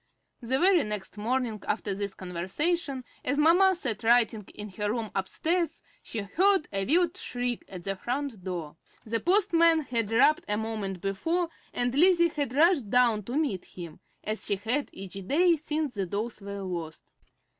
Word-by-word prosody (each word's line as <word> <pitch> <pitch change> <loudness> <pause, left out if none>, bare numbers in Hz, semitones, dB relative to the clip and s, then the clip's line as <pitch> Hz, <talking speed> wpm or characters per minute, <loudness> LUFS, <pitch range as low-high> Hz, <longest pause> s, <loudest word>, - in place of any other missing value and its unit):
The 250 +2 0
very 360 +1 +4
next 210 -2 -5
morning 230 -1 -1
after 205 -2 -1
this 200 0 -4
conversation, 255 - -2 0.2
as 280 +3 0
mamma 355 +5 +5
sat 265 - -3
writing 225 -3 +3
in 210 0 -6
her 205 +2 -3
room 225 -2 -3
upstairs, 330 - -1 0.2
she 225 - -5
heard 365 - +2
a 195 0 -1
wild 345 +4 +3
shriek 245 -8 -3
at 180 -2 -8
the 195 +1 -2
front 245 -1 -4
door. 170 -5 -5 0.3
The 230 +1 -1
postman 335 - +4
had 230 -6 -2
rapped 270 +7 +4
a 210 - +1
moment 210 -4 -4
before, 325 - -1 0.2
and 245 0 -1
Lizzie 340 +3 +5
had 285 -6 -3
rushed 305 - +4
down 235 -2 +3
to 245 +6 -3
meet 270 - -1
him, 170 -3 -10 0.2
as 215 +1 -1
she 205 - +1
had 230 +9 -1
each 195 0 -9
day 340 - +4
since 305 -2 -2
the 195 -4 -2
dolls 210 +4 -4
were 200 0 -6
lost. 170 -4 -5
235 Hz, 165 wpm, -28 LUFS, 200-310 Hz, 0.3 s, mamma